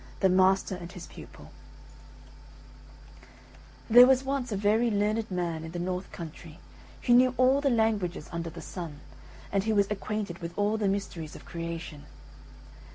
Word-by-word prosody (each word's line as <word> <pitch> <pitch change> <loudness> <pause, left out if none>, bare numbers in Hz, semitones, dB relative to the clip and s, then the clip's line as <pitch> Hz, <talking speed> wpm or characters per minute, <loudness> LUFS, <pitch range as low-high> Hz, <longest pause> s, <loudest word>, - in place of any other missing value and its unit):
THE 190 - +5
MASTER 190 +1 +3
AND 175 -1 -9
HIS 180 -3 -9
PUPIL - - -13 2.4
There 245 +2 +9
was 265 0 +4
once 270 -3 -2
a 205 - -1
very 215 +4 +2
learned 215 +1 0
man 170 -3 -2
in 160 +1 -8
the - - -4
north 180 +2 -3
country 165 -1 -9 0.5
who 240 - +4
knew 250 +1 +5
all 260 +3 +4
the 280 - +2
languages 215 - 0
under 170 0 -4
the - - -10
sun, 160 -5 -7 0.5
and 195 -1 +1
who 220 -1 +1
was 200 0 +2
acquainted 210 -3 -3
with 170 0 -7
all 205 +1 +1
the 210 -2 0
mysteries 185 -5 -3
of - - -12
creation. 165 -3 -6
195 Hz, 160 wpm, -28 LUFS, 170-220 Hz, 2.4 s, There